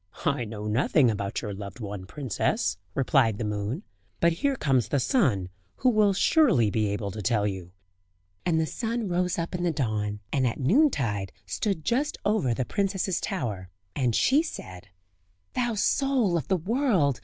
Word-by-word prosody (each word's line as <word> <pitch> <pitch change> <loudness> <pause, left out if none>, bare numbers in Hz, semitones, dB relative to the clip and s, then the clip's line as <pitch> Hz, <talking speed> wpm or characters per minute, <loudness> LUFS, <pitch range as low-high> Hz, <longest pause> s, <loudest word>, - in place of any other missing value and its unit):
"I 140 -6 +1
know 105 -1 -6
nothing 120 +3 +3
about 100 -2 -3
your 105 -3 -4
loved 100 +3 -8
one, 100 -4 -6
princess," 130 -2 -1 0.2
replied 130 -5 +3
the 115 - -3
moon; 105 - -3 0.4
"but 170 0 +4
here 275 +11 0
comes 135 - +1
the 145 - +1
sun, 125 - +1 0.3
who 255 - +2
will 210 -3 +4
surely 190 - +4
be 110 0 +1
able 100 0 -2
to 105 +3 -6
tell 105 -1 +1
you." 95 -3 -4 0.7
And 165 -3 +1
the 160 - +2
sun 230 +4 -3
rose 180 0 0
up 170 +1 -3
in 180 - -2
the 175 -1 +1
dawn, 105 -7 -2
and 130 -3 +2
at 115 - -3
noontide 135 - +2
stood 160 - -2
just 285 - 0
over 205 - +2
the 130 - -1
princess's 195 - -1
tower, 110 - -3 0.3
and 125 -5 +1
she 280 +4 +4
said: 95 - -8 0.7
"Thou 240 -2 0
soul 245 -2 +2
of 160 -6 -1
the 190 - +2
world! 185 - +1
140 Hz, 170 wpm, -27 LUFS, -, 0.7 s, but